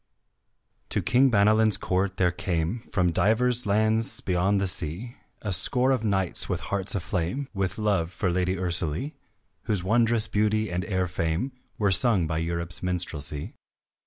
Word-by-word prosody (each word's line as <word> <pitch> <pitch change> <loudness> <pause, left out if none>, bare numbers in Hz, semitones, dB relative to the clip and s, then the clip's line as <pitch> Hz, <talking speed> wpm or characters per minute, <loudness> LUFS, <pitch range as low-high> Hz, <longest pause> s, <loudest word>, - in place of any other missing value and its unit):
To - - 0
King 125 +3 +4
Banalin's 110 0 +4
court 95 +1 -1
there 90 -2 +2
came 90 +3 -2
From 90 -4 +1
divers 120 +6 +2
lands 110 +2 +2
beyond 95 +2 0
the 100 - 0
sea 95 - -3 0.3
A 100 -3 0
score 125 +8 +3
of 130 -4 0
knights, 95 -4 0
with - - -1
hearts 100 0 0
aflame 100 +8 -3
With 95 -2 -2
love 100 -6 0
for 90 +1 -1
lady 90 +1 0
Ursalie, 90 - -1 0.5
Whose 100 -5 0
wondrous 115 +2 +2
beauty 110 0 0
and 90 +1 -2
fair 95 -3 -1
fame 85 +7 -2 0.3
Were 100 -2 +1
sung 105 -4 +3
by 80 0 -2
Europe's 85 +1 -1
minstrelsy. 80 -5 -3
95 Hz, 150 wpm, -26 LUFS, 90-110 Hz, 0.5 s, King